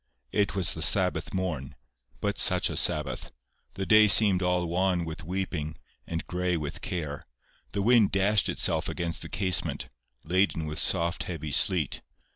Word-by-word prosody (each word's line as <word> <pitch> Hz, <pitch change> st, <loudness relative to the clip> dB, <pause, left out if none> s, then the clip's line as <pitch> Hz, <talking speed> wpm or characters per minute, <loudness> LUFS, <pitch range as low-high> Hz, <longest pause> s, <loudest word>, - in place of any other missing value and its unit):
It 100 Hz, -2 st, 0 dB
was 95 Hz, -3 st, +2 dB
the -, -, -7 dB
Sabbath -, -, +1 dB
morn. 80 Hz, -7 st, -4 dB, 0.5 s
But -, -, -1 dB
such -, -, +4 dB
a -, -, -5 dB
Sabbath! 70 Hz, -4 st, 0 dB, 0.4 s
The 95 Hz, -, -4 dB
day 110 Hz, +1 st, +6 dB
seemed 100 Hz, -3 st, +5 dB
all 90 Hz, -1 st, 0 dB
wan 90 Hz, 0 st, 0 dB
with 80 Hz, 0 st, -7 dB
weeping, 85 Hz, -3 st, -4 dB, 0.3 s
and 80 Hz, -1 st, -4 dB
gray 90 Hz, 0 st, -2 dB
with 75 Hz, -2 st, -6 dB
care. 75 Hz, -5 st, -4 dB, 0.5 s
The 100 Hz, -, -1 dB
wind 115 Hz, -2 st, +4 dB
dashed 100 Hz, 0 st, +2 dB
itself -, -, +1 dB
against 85 Hz, -2 st, -2 dB
the -, -, -7 dB
casement, 95 Hz, -8 st, -1 dB, 0.3 s
laden 90 Hz, -1 st, 0 dB
with 75 Hz, 0 st, -3 dB
soft 85 Hz, +1 st, +1 dB
heavy 80 Hz, -4 st, -6 dB
sleet. 75 Hz, +4 st, +2 dB
90 Hz, 155 wpm, -27 LUFS, 80-95 Hz, 0.5 s, day